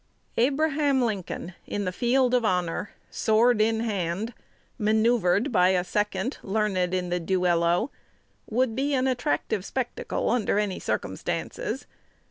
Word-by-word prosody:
Abraham 285 +2 +2
Lincoln 190 -5 -3
in 205 -1 -2
the 185 - -1
field 250 +5 +2
of 250 -1 +3
honor, 180 -1 0 0.2
sword 225 +1 +3
in 225 +1 +2
hand, 205 0 -2 0.5
manoeuvred 220 +1 +2
by 180 -5 +4
a 185 -1 +2
second 210 +5 -1
learned 195 -3 0
in 180 -1 -2
the 180 0 0
duello, 175 - +1 0.6
would 235 0 +1
be 280 +2 0
an 260 0 +1
attractive 240 - 0
spectacle 245 +4 -2
under 230 -4 +1
any 205 -3 0
circumstances. - - -3
215 Hz, 125 wpm, -26 LUFS, 185-245 Hz, 0.6 s, by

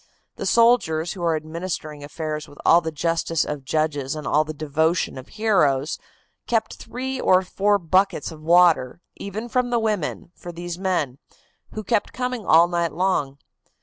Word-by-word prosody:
The - - -3
soldiers, 230 -9 +3
who 190 - -9
are 165 -2 +1
administering 155 -1 -5
affairs 155 +1 -5
with 145 - -16
all 170 - +6
the 160 -1 -4
justice 165 +1 0
of 150 -2 -5
judges 145 -1 -1
and 155 - -6
all 150 +1 +3
the 155 - -6
devotion 155 +3 0
of 130 0 -9
heroes, 160 -10 +1 0.5
kept 225 -2 0
three 260 +2 -5
or 185 0 +4
four 205 +2 +1
buckets 185 -1 +1
of 155 -1 -11
water, 170 -5 +4 0.2
even 210 +4 -6
from 250 +1 0
the 240 - +1
women, 210 -7 -2
for 175 - -9
these 175 +1 -6
men, 165 -9 -1 0.5
who 215 - -5
kept 210 +1 0
coming 250 -4 -3
all 165 +2 +6
night 170 -2 -1
long. 160 -6 0
170 Hz, 165 wpm, -23 LUFS, 155-200 Hz, 0.5 s, all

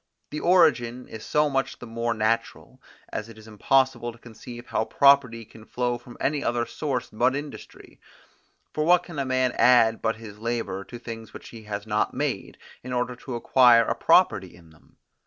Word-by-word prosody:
This 150 - -4
origin 135 -9 +2
is 110 -1 -9
so 150 0 +1
much 135 -1 -2
the - - -10
more 115 0 -2
natural, 110 +2 -2 0.3
as 110 +1 -4
it 115 - -13
is 110 0 -14
impossible 120 +2 +1
to 115 - -17
conceive 120 +1 -11
how 110 - -1
property 135 -5 +3
can 110 +1 -16
flow 120 +1 -2
from 120 0 -14
any 145 +1 -1
other 120 0 0
source 125 -1 -4
but 130 +5 +1
industry; 145 0 -9 0.7
for 155 - -1
what 175 +2 +4
can 165 -5 -8
a 140 - -1
man 130 -1 +1
add 115 -3 +5
but 110 0 0
his 110 -2 -12
labour 115 -4 -3
to 120 - -9
things 115 -1 -9
which - - -10
he 110 -2 -12
has 100 -1 -5
not 105 0 -1
made, - - -3 0.3
in 125 +1 -6
order 125 0 -2
to 125 0 -7
acquire 120 -1 +5
a - - 0
property - - +2
in 85 -2 -19
them? 80 - -25
120 Hz, 190 wpm, -25 LUFS, 115-130 Hz, 0.7 s, add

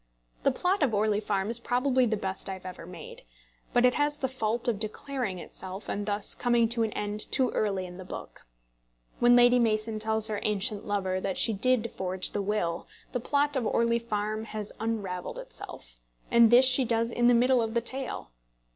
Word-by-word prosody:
The - - +3
plot 370 +2 0
of 255 -7 +2
Orley 210 0 +1
Farm 205 0 -1
is 235 - +6
probably 250 +1 +1
the 220 -1 0
best 195 0 -5
I - - -2
have 185 -1 -10
ever 180 -2 -8
made; 475 - -10 0.5
but 245 0 +4
it 250 - +4
has 295 0 0
the 265 - -1
fault 235 -1 -2
of 225 -4 0
declaring 220 -1 -4
itself, 185 +3 -6
and 205 +1 -3
thus 205 0 +1
coming 240 -2 +2
to 235 0 -2
an 220 -1 0
end 210 0 -3
too 260 -3 +2
early 195 -3 -1
in 180 0 -10
the 190 - -8
book. 180 - -10 0.7
When 240 0 +6
Lady 245 0 +6
Mason 215 -1 0
tells 220 0 +2
her 210 -2 -2
ancient 210 0 -1
lover 190 -2 -1
that 190 -1 -3
she 225 - +2
did 230 +2 +1
forge 185 0 -1
the 205 - -2
will, 190 -4 -2 0.2
the 250 - -2
plot 285 +4 +1
of 245 -5 0
Orley 235 0 +2
Farm 215 -1 -3
has 215 -2 -5
unravelled 205 -5 -3
itself; - - -8 0.3
and 235 -1 +6
this 245 +3 +7
she 260 +1 +4
does 230 -1 0
in 240 0 +2
the 245 - +6
middle 250 +1 +4
of 225 0 -3
the - - +4
tale. 260 - -3
220 Hz, 200 wpm, -28 LUFS, 205-245 Hz, 0.7 s, this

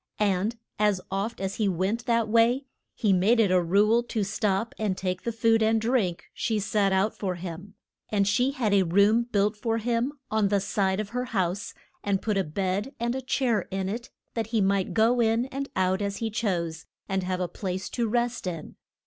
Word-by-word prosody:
And 205 +2 +1 0.2
as 210 -3 +3
oft 200 +4 -2
as 195 0 -3
he 215 - +1
went 195 +6 -1
that 230 -2 +2
way, 235 +5 +3 0.3
he 210 -4 +2
made 205 +6 +3
it 205 -5 +4
a 185 -1 +4
rule 205 +7 +3
to 230 -3 -2
stop 210 +1 -1
and 205 -4 0
take 185 -1 -2
the 235 - -2
food 225 0 +2
and 220 +1 +3
drink 220 -7 0
she 220 - -1
set 205 -1 +1
out 190 +3 +1
for 185 -3 -2
him. 180 +3 -8 0.3
And 200 -2 +2
she 245 +6 +3
had 250 -7 0
a 200 - +5
room 200 +6 +4
built 205 +1 +2
for 225 +1 -1
him 235 +4 0 0.2
on 215 -2 +2
the 200 0 +2
side 195 0 0
of 215 -1 -3
her 250 +2 -2
house, 195 -5 -2 0.3
and 200 -1 +1
put 215 0 -1
a 195 - +2
bed 190 - -2
and 235 +1 0
a 265 - -3
chair 245 -6 0
in 190 0 -2
it, 235 +5 -4 0.2
that 225 -2 -2
he 225 -1 0
might 195 -1 +1
go 230 +3 +4
in 230 +1 +2
and 275 +1 -4
out 185 +1 +1
as 200 -1 -2
he 225 -1 -2
chose, 175 -7 -2 0.2
and 190 0 0
have 185 0 -2
a 180 - 0
place 185 +1 -4
to 235 -2 -1
rest 240 -2 -1
in. 165 -4 -6
210 Hz, 210 wpm, -27 LUFS, 190-230 Hz, 0.3 s, a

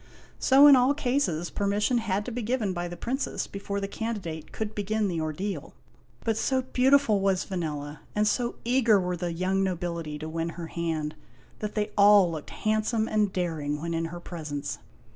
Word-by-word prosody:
So 275 +2 +7
in 290 -2 +10
all 255 +3 +4
cases, 245 - 0
permission 205 +4 +1
had 205 -2 -1
to 250 - -4
be 245 +1 -3
given 220 -4 -1
by 175 0 -3
the 175 0 -7
Princess 265 +4 -2
before 200 0 -4
the 195 - -3
can 225 +3 -3
didate 160 -4 -7
could 220 -1 -4
begin 210 +1 0
the 170 -4 -2
ordeal. 170 +6 -4 0.5
But 225 -2 0
so 260 +2 +1
beautiful 260 -4 +3
was 195 -1 +1
Vanella, 150 -5 -4 0.2
and 210 0 +2
so 240 +2 0
eager 235 -4 +4
were 180 -1 -1
the 175 0 -3
young 185 +3 0
nobility 170 -4 -3
to 155 +1 -6
win 165 +1 -2
her 170 - -4
hand, 160 -2 -2 0.5
that 210 -1 -4
they 210 -1 -1
all 200 -3 +6
looked 155 -2 -6
handsome 220 +1 0
and 210 -2 +1
daring 155 -5 -2
when 170 +2 -3
in 165 0 -1
her 170 +1 -6
presence. 150 -5 -5
195 Hz, 185 wpm, -27 LUFS, 165-220 Hz, 0.5 s, in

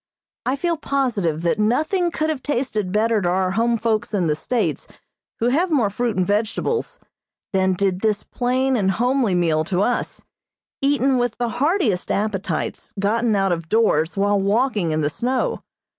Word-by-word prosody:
I 260 - +2
feel 335 +3 -1
positive 220 - -1
that 175 +6 +1
nothing 315 - +1
could 315 -2 -1
have 290 -4 -4
tasted 240 -9 -2
better 220 +1 +2
to 175 - 0
our 185 +1 +1
home 230 +4 +1
folks 220 -1 -1
in 185 -4 +1
the 150 -2 +1
States 235 +9 -2 0.5
who 235 - +2
have 335 +8 +1
more 245 -11 +2
fruit 235 0 -1
and 185 - +2
vegetables 220 - -1 0.6
than 190 0 +2
did 190 0 0
this 215 -2 0
plain 260 +2 0
and 195 -5 +1
homely 245 -1 +1
meal 160 -3 +2
to 185 +1 0
us, 245 - -2 0.6
eaten 275 -2 +2
with 245 -2 -1
the 240 -1 -1
heartiest 265 - 0
appetites 200 -5 -2
gotten 220 +2 +1
out 195 -1 +1
of 165 -2 -3
doors 195 -7 +2
while 200 0 +2
walking 205 -2 +1
in 155 0 0
the 145 - +1
snow. 260 - -1
220 Hz, 170 wpm, -21 LUFS, 190-255 Hz, 0.6 s, I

